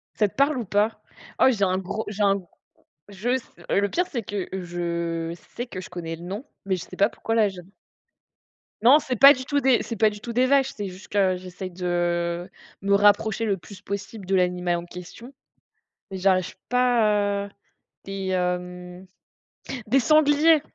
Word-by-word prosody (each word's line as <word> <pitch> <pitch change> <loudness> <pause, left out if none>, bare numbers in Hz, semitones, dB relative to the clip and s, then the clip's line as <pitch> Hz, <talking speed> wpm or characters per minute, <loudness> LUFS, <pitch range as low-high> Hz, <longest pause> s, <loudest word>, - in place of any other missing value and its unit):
Ça 210 - +3
te - - -15
parle 280 +1 +2
ou 240 - -3
pas? 205 +3 0 0.4
Oh, - - +6
j'ai 220 -6 0
un 185 -1 +2
gros, 200 +4 -4
j'ai 210 0 -2
un 200 -1 +4
g - - -14 0.7
je 200 +4 -4
s 255 -1 +1 0.3
le 200 +1 +2
pire, 360 - 0
c'est 235 -5 -3
que 200 -2 -4
je 170 -2 -3 0.2
sais 245 - -4
que 185 -6 -7
je - - -10
connais 170 -2 -5
le 165 - -14
nom 200 +9 -6 0.2
mais 190 -1 0
je 180 - -7
sais - - -11
pas 200 +3 +3
pourquoi 225 - -3
là 215 -3 +4
j'ai 190 -2 -10
un - - -10 1.2
Non, 265 +6 +8
c'est 260 -4 -3
pas 275 +5 +9
du 260 -2 -7
tout 285 +2 +1
des 265 -3 +3
c'est 230 - -5
pas 220 -1 +3
du 210 - -9
tout 235 +1 -6
des 250 +2 +3
vaches, 270 0 +3
c'est 205 - -3
juste 185 +1 -11
que 190 -2 +2
j'essaye 185 +1 -8
de, 180 +1 -7 0.6
heu, - - -16 0.3
me 200 0 +2
rapprocher 205 +2 +3
le 200 -3 0
plus 195 +2 -13
possible 200 0 -6
de 195 - +2
l'animal 180 -1 +1
en 170 - -6
question, 180 +9 -11 0.8
mais 190 - -4
j'arrive 185 -1 +1
pas, 210 -5 +2
heu, - - -14 0.6
des, 195 -1 -4
hem, 180 0 -3 0.8
des 265 +6 +3
sangliers! 305 +3 +5
200 Hz, 195 wpm, -24 LUFS, 185-235 Hz, 1.2 s, pas